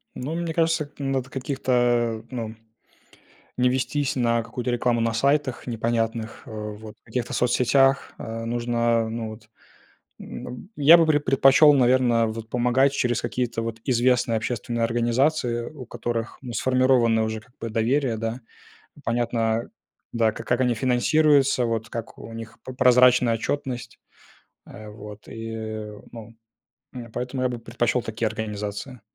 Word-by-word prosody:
Ну, 145 +6 -4
мне 170 -1 -2
кажется, 160 -3 +1
надо 135 -2 -2
каких-то, 120 -4 0
ну, 120 -3 -3
м 110 0 -10 1.0
не 125 0 +4
вестись 135 +2 -1
на 115 -2 +1
какую-то 120 +2 -4
рекламу 120 -1 +1
на 115 0 0
сайтах 140 +1 0
непонятных, 115 -1 -2
а, - - -12
вот 105 0 -7
в - - -60
каких-то 120 +1 -3
соцсетях, 135 +2 +2
а, 115 0 -6
нужно, 120 0 +1
а, 110 - -3
ну 115 -1 -4
вот, 110 0 -13 0.7
н - - -8
аб - - -6 0.2
я 155 +4 +8
бы 165 - +4
пред 150 -2 +2
предпочел, 135 +3 +6
наверно, 125 -3 +3
вот 110 0 -6
помогать 125 +3 +2
через 120 -4 0
какие-то 120 -2 -2
вот 115 0 -4
известные 125 -2 +2
общественные 120 +1 -2
организации, 120 +1 +1
у 130 0 -9
которых, 115 0 -4
ну, 120 - -6
сформировано 125 -3 +3
уже 110 0 -3
как 120 +3 -24
бы 115 -1 -4
доверие, 115 +2 +1
да. 115 0 -2 0.6
М, - - -17
понятно, 115 -1 0 0.4
да, 115 -2 +2
как - - -9
как 125 +1 +1
они 125 -2 +2
финансируются, 135 +2 +3
вот 115 -1 -2
как 115 -1 -6
у 115 - -10
них 115 -1 -9
п 130 - -7
прозрачная 125 -1 +5
отчетность, 125 +1 -4 0.7
а 110 -1 -11
вот 105 -1 -11
и, 115 0 -7
э, 110 -2 -6
ну, 115 -1 -11 0.6
и 125 -2 -7
поэтому 125 +2 -3
я - - +3
бы 120 -1 -4
предпочел 120 +1 -1
такие 110 +1 -3
организации. 105 +3 -5
120 Hz, 155 wpm, -24 LUFS, 115-130 Hz, 1.0 s, я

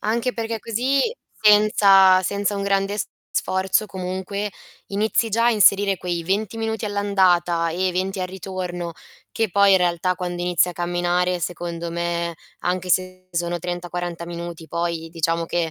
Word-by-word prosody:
anche 235 +4 0
perché 225 -1 -3
così 250 +6 0 0.4
senza 200 -3 +6
senza 200 +2 -1
un 200 - -2
grande 195 +1 0
s - - -2 0.2
sforzo 190 +3 0
comunque 190 +2 -4 0.4
inizi 215 +3 +1
già 230 +3 +2
a - - +5
inserire 200 -2 +4
quei 175 -2 -3
20 205 +5 -1
minuti 225 0 -2
all'andata 185 -5 +2
e 185 +2 0
20 190 +2 -2
al 185 - -1
ritorno, 180 -2 -5 0.4
che 225 -1 0
poi 200 +2 +5
in - - +7
realtà 180 0 +1
quando 175 -1 -4
inizi 180 0 +2
a - - -4
camminare 175 +1 0
secondo 170 0 -4
me, 170 0 -2 0.3
anche 180 0 -2
se 185 0 -1
sono 175 0 -2
30-40 175 0 -4
minuti 170 -1 -7
poi 170 -1 -3
diciamo 165 0 0
che, 165 0 -1
185 Hz, 155 wpm, -22 LUFS, 175-200 Hz, 0.4 s, in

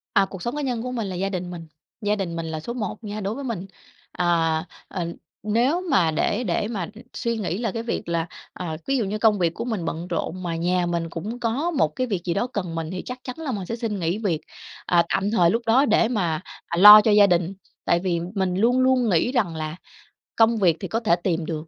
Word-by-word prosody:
À, 195 -2 +5
cuộc 190 -1 -9
sống 240 +7 -3
cá 295 - -2
nhân 250 -5 -2
của 250 +1 -4
mình 230 -5 -2
là 185 - -4
gia 195 +2 -1
đình 180 -2 -4
mình. 165 -2 -8 0.3
Gia 210 0 +1
đình 185 -5 -3
mình 165 -1 -3
là 160 -1 -4
số 235 +10 -5
một 220 -2 -4
nha 210 0 -5
đối 200 +3 -2
với 280 - -6
mình, 225 -8 -4 0.5
à, 165 -2 +1 0.2
ờ, 180 -3 -3 0.4
nếu 240 - +2
mà 170 -11 +4
để 205 +9 0
để 200 0 0
mà, 215 -4 -3
ừm, 175 - -5
để 225 - -12
suy 235 -1 -2
nghĩ 190 -4 -2
là 225 -2 -1
cái 230 +2 -4
việc 230 - -3
là, 170 0 0 0.3
à, 160 -3 -5
ví 275 0 +2
dụ 230 - 0
như 205 +2 -2
công 215 -1 +3
việc 170 -2 +1
của - - -5
mình 220 -8 -2
bận 165 +1 -4
rộn, 185 0 -3
mà 170 -2 -2
nhà 175 +2 +1
mình 170 -1 -2
cũng 205 +9 -5
có 250 +9 0
một 300 - +2
cái 255 -1 -1
việc 195 -6 -2
gì 175 - 0
đó 200 +7 0
cần 180 -9 -4
mình 165 -1 -3
thì 185 - -4
chắc 250 0 -6
chắn 255 - -6
là 310 -4 -3
mình 200 -5 -4
sẽ 230 - -3
xin 225 -4 -3
nghỉ 170 +2 0
việc, 185 -8 -1 0.4
à, 170 -1 +4
tạm 200 +2 0
thời 180 -7 +4
lúc 230 +6 +1
đó 250 +5 +4
để 225 - +3
mà, 175 -9 -1 0.3
à, 170 - -3
lo 210 +3 +11
cho 215 - +2
gia 205 -1 +7
đình. 175 0 +1 0.3
Tại 170 - +3
vì 175 -2 -1 0.2
mình 190 -2 0
luôn 235 +6 +3
luôn 255 -2 +3
nghĩ 180 +6 +2
rằng 210 -11 0
là 155 0 -4 0.6
công 230 0 +4
việc 175 -6 +3
thì 190 - -4
có 225 - -1
thể 215 -7 +3
tìm 170 -3 0
được, 155 0 -5
195 Hz, 260 wpm, -24 LUFS, 170-230 Hz, 0.6 s, lo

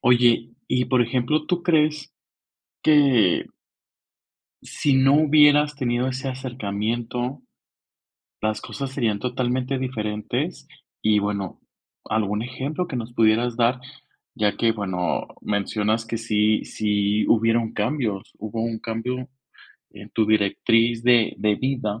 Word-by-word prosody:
Oye, 120 -1 +3 0.2
y, 125 0 +1
por 130 -2 +3
ejemplo, 125 +6 0
¿tú 175 0 -1
crees 155 -3 +1 0.7
que? 135 - +4 1.2
¿Si 140 - 0
no 135 +1 +5
hubieras 150 -1 +5
tenido 125 -2 -1
ese 130 +1 -3
acercamiento, 120 +1 -3 1.0
las 110 0 -1
cosas 140 -2 -6
serían 110 -6 -1
totalmente 125 +2 -1
diferentes? 110 -5 -3 0.3
Y 105 -1 +3
bueno, 100 -2 -3 0.5
algún 105 0 -1
ejemplo 135 +8 -4
que 145 - -5
nos 120 0 -6
pudieras 115 +1 +2
dar, 125 +1 +2 0.5
ya 105 -5 0
que 115 -1 +3
bueno, 95 -4 -2
mencionas 105 +2 -1
que 115 0 -4
si 110 -1 +1
si 105 0 0
hubieron 115 0 +2
cambios, 105 -3 -2
hubo 110 +2 -5
un 115 -1 -2
cambio, 125 +3 -4 0.6
en 105 0 -12
tu 110 -2 +1
directriz 115 +2 +2
de 120 -2 +4
de 105 -1 +1
vida, 125 -5 -2
115 Hz, 120 wpm, -23 LUFS, 110-130 Hz, 1.2 s, no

